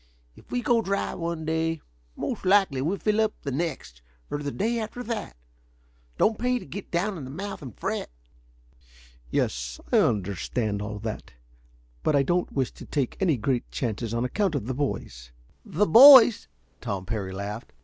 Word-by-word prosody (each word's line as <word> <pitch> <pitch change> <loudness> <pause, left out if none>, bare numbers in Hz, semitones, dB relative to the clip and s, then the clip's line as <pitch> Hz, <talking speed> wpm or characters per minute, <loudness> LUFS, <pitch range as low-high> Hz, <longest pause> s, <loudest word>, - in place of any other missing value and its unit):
If - - -19
we 245 -1 -1
go 235 -1 +3
dry 200 -2 -2
one 170 -2 -4
day, 160 0 -1 0.4
most 240 - -4
likely 190 -8 +3
we 170 +8 -1
fill 215 +1 +1
up 220 -1 -1
the 140 - -3
next, 130 - -4 0.3
or 145 - -2
the 145 -1 -3
day 230 +7 -1
after 225 +3 -5
that. 225 - -5 0.8
Don't 220 0 +2
pay 250 +1 +1
to - - -8
get 200 - -8
down 185 +2 -1
in - - -7
the 130 - -7
mouth 195 +8 -6
and 130 -7 -10
fret." - - -3 1.2
"Yes, - - -2
I - - +5
understand 100 +2 -1
all 105 0 -5
that. 110 - -6 0.7
But 155 - +1
I 140 - +4
don't 175 +5 0
wish 135 -3 -1
to - - -12
take 140 -5 -1
any 170 -8 +2
great 120 +2 -1
chances 115 -2 -3
on 115 +1 -1
account 190 +5 0
of 125 -7 -2
the 130 - -2
boys." - - -4 0.3
"The 210 +6 +1
boys?" 245 - +9 0.3
Tom 100 -6 -4
Parry 100 -2 -3
laughed. 100 +4 -6
150 Hz, 175 wpm, -26 LUFS, -, 1.2 s, boys